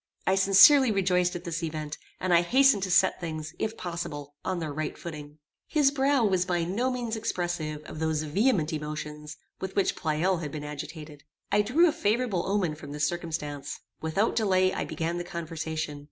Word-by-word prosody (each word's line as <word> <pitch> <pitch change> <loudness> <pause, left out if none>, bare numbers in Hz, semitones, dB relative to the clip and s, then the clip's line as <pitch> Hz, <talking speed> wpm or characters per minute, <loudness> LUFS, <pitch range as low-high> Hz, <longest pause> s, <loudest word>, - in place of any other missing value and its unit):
I 190 - +3
sincerely 200 +8 +7
rejoiced 180 -3 +1
at 175 - -5
this 170 -2 -3
event, 155 -2 -4 0.2
and 185 -1 +1
I 170 - +6
hastened 260 +3 +4
to 190 - -2
set 185 +1 +3
things, 155 -2 -5
if 220 +1 -2
possible, 165 -5 -5
on 185 - -2
their 160 -4 -4
right 155 +1 -4
footing. 150 -3 -8 0.3
His 290 -3 +3
brow 275 -3 +2
was 185 -3 +2
by 175 -2 0
no 210 +9 0
means 240 -3 -2
expressive 175 -8 -3
of 155 - -9
those 160 -1 0
vehement 165 - +1
emotions 150 0 -6 0.2
with 190 0 -5
which 195 - +2
Pleyel 165 +4 0
had 150 -3 -5
been 150 0 -6
agitated. 150 0 -8 0.3
I 205 - +4
drew 280 +12 +4
a - - +3
favorable 225 - 0
omen 195 -5 +1
from 145 -1 -9
this 150 0 0
circumstance. 150 -4 -4 0.2
Without 165 +8 0
delay 185 -4 +3
I - - -2
began 165 +2 -3
the - - -3
conversation. 160 -3 -4
175 Hz, 180 wpm, -28 LUFS, 155-200 Hz, 0.3 s, sincerely